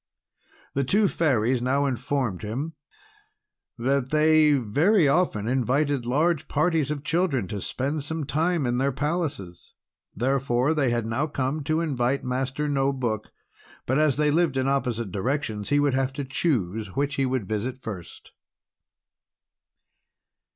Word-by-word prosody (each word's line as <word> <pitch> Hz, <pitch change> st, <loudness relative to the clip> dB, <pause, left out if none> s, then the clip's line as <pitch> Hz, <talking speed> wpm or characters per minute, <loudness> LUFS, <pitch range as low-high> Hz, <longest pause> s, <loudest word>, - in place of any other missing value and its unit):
The 140 Hz, -, +1 dB
two 200 Hz, +10 st, +3 dB
Fairies 130 Hz, -, +1 dB
now 135 Hz, +3 st, +1 dB
informed 130 Hz, -6 st, -1 dB
him 130 Hz, +10 st, -4 dB, 1.0 s
that 130 Hz, +2 st, 0 dB
they 155 Hz, 0 st, +4 dB
very 145 Hz, -, +3 dB
often 140 Hz, -, +1 dB
invited 130 Hz, +1 st, +1 dB
large 155 Hz, +4 st, +1 dB
parties 155 Hz, -1 st, +1 dB
of 150 Hz, -2 st, -3 dB
children 160 Hz, -, 0 dB
to 100 Hz, -2 st, -4 dB
spend 140 Hz, +7 st, -2 dB
some 160 Hz, +1 st, -3 dB
time 160 Hz, +2 st, 0 dB
at 120 Hz, 0 st, 0 dB
their 135 Hz, +1 st, +1 dB
palaces. 140 Hz, -, -4 dB, 0.4 s
Therefore 130 Hz, +3 st, +1 dB
they 145 Hz, -5 st, +1 dB
had 120 Hz, -2 st, 0 dB
now 115 Hz, +7 st, -1 dB
come 140 Hz, +1 st, -2 dB
to 155 Hz, +2 st, +1 dB
invite 135 Hz, -4 st, 0 dB
Master 130 Hz, +4 st, -2 dB
No 140 Hz, -1 st, +1 dB
Book, 120 Hz, -6 st, -3 dB, 0.5 s
but 130 Hz, +4 st, +1 dB
as 155 Hz, -4 st, +3 dB
they 150 Hz, -1 st, +2 dB
lived 160 Hz, -3 st, +2 dB
in 130 Hz, 0 st, +1 dB
opposite 120 Hz, -6 st, -1 dB
directions, 105 Hz, 0 st, -2 dB
he 145 Hz, +1 st, +3 dB
would 145 Hz, -2 st, +2 dB
have 135 Hz, 0 st, 0 dB
to 140 Hz, +1 st, -4 dB
choose 110 Hz, -, -1 dB
which 145 Hz, +1 st, 0 dB
he 135 Hz, -1 st, +1 dB
would 130 Hz, -6 st, -2 dB
visit 110 Hz, +5 st, -2 dB
first. 105 Hz, -9 st, -9 dB
135 Hz, 145 wpm, -25 LUFS, 120-150 Hz, 1.0 s, they